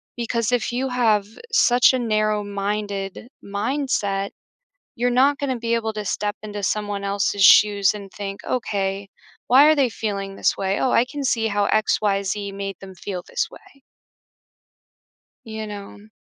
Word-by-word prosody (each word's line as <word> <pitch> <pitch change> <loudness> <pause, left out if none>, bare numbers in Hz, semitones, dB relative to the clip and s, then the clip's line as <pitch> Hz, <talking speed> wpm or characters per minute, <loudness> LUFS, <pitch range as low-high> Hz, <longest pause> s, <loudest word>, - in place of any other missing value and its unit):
because 235 -1 -1
if 245 -2 0
you 255 +2 -1
have 225 -5 +2 0.3
such 245 - +5
a - - +2
narrow-minded 210 -2 -2
mindset, 200 -2 -1 0.7
you're 245 +1 +1
not 270 +4 +3
gonna 270 -3 -1
be 230 0 -2
able 220 -1 -2
to 210 0 -4
step 205 +1 -2
into 210 -1 -6
someone 205 0 -2
else's 200 0 0
shoes 205 -1 +6
and 200 -2 -9
think, 200 -1 -6
"Okay, 200 -5 -2 0.4
why 265 +4 +7
are 310 +1 +6
they 275 -3 +3
feeling 200 -3 -4
this - - +1
way? 195 0 -1
Oh, 260 - +1
I 235 - +4
can 285 +2 -6
see 230 -4 +1
how 205 -1 0
X, 215 0 +2
Y, 200 -2 +1
Z, 200 +1 -3
made 195 -1 -5
them 190 -1 -11
feel 180 -1 -6
this - - -2
way.” 275 - -17 1.6
You 220 -1 -6
know? 205 0 -9
210 Hz, 160 wpm, -22 LUFS, 200-240 Hz, 1.6 s, why